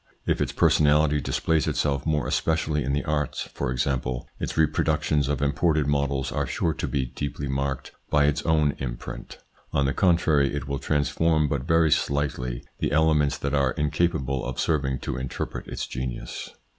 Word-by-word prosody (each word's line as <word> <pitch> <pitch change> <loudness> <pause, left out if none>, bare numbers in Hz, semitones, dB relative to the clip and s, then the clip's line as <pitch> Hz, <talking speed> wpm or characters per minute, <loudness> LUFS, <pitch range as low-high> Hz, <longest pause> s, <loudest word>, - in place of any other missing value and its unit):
If - - +1
its - - 0
personality 75 0 +3
displays 80 +2 0
itself 70 -1 0
more 75 -2 +1
especially 80 -2 0
in 70 - -1
the 70 +1 -1
arts, 75 -2 -1
for - - -2
example, 65 -1 -1
its - - -4
reproductions 75 -2 +2
of 70 -1 0
imported 75 +1 +2
models 70 -2 0
are 70 -1 -1
sure 80 +6 0
to - - -3
be 65 -2 -1
deeply 70 +3 -4
marked 70 -1 -2 0.2
by 75 -1 +4
its 75 0 +1
own 75 -3 +2
imprint. - - -6 0.4
On 70 - +2
the 70 - +1
contrary 80 -6 +3
it 70 -1 -4
will 70 -1 -2
transform 75 +2 +1
but 70 -2 -2
very 80 -2 +4
slightly 65 -5 0 0.2
the - - 0
elements 75 -2 +3
that 70 0 -3
are 70 -3 +2
incapable 75 -3 0
of - - -4
serving 70 -5 +1
to - - -3
interpret 65 0 -5
its - - -4
genius. 65 0 -5
70 Hz, 170 wpm, -25 LUFS, 70-75 Hz, 0.4 s, by